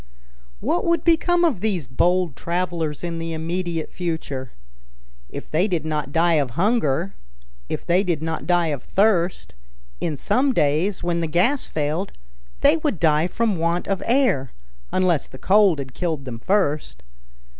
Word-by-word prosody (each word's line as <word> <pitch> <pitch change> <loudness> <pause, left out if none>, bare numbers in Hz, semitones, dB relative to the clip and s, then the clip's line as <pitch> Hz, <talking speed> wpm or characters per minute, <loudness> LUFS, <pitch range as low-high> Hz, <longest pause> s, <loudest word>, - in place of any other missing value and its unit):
What - - 0
would 335 0 +1
become 345 +1 +3
of 270 - 0
these 195 -8 -1
bold 175 +5 +1
travelers 170 -3 -2
in 170 -1 -3
the 165 0 -4
immediate 165 0 -3
future? 160 -7 -4 0.8
If - - -8
they 175 +6 +2
did 170 -6 -2
not 150 -3 -2
die 165 -1 +3
of 125 -4 -5
hunger, 190 - +1 0.6
if - - -4
they 180 +3 +3
did 175 -5 0
not 160 +1 -4
die 175 -2 +2
of 145 -4 -3
thirst, 185 - +1 0.5
in 150 - -2
some 255 - +1
days, 155 +7 +1
when 170 -1 0
the 165 - -1
gas 190 - +1
failed, 155 +5 -2 0.5
they 290 +3 +5
would 300 - -2
die 155 0 +3
from 220 0 0
want 170 +2 0
of 195 -2 -1
air, 225 - +2 0.4
unless 180 -5 +1
the 130 - -12
cold 195 0 +4
had 130 -2 -6
killed 160 -6 -3
them 120 -3 -6
first. 155 - 0
170 Hz, 155 wpm, -22 LUFS, 155-195 Hz, 0.8 s, they